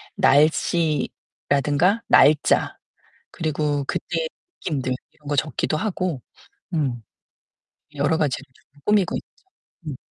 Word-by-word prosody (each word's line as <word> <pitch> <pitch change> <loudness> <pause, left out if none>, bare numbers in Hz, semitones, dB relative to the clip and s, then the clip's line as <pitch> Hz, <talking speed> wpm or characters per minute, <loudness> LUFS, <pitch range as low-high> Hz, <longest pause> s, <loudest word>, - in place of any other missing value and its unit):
날씨라든가 155 +4 +2
날짜 150 0 +4 0.5
그리고 150 -2 -1
그때 165 -2 -2 0.4
느낌들 130 -6 -1 0.2
이런 145 - -18
거 145 - 0
적기도 155 +2 0
하고 180 - -2 0.5
음 130 -8 -1 0.9
여러 145 +3 +1
가지를 140 -3 0
조금 145 +1 -26
꾸미고 210 -4 +2
있죠. 380 - -11 0.4
음. 140 -4 -4
150 Hz, 220 characters per minute, -23 LUFS, 140-165 Hz, 0.9 s, 날짜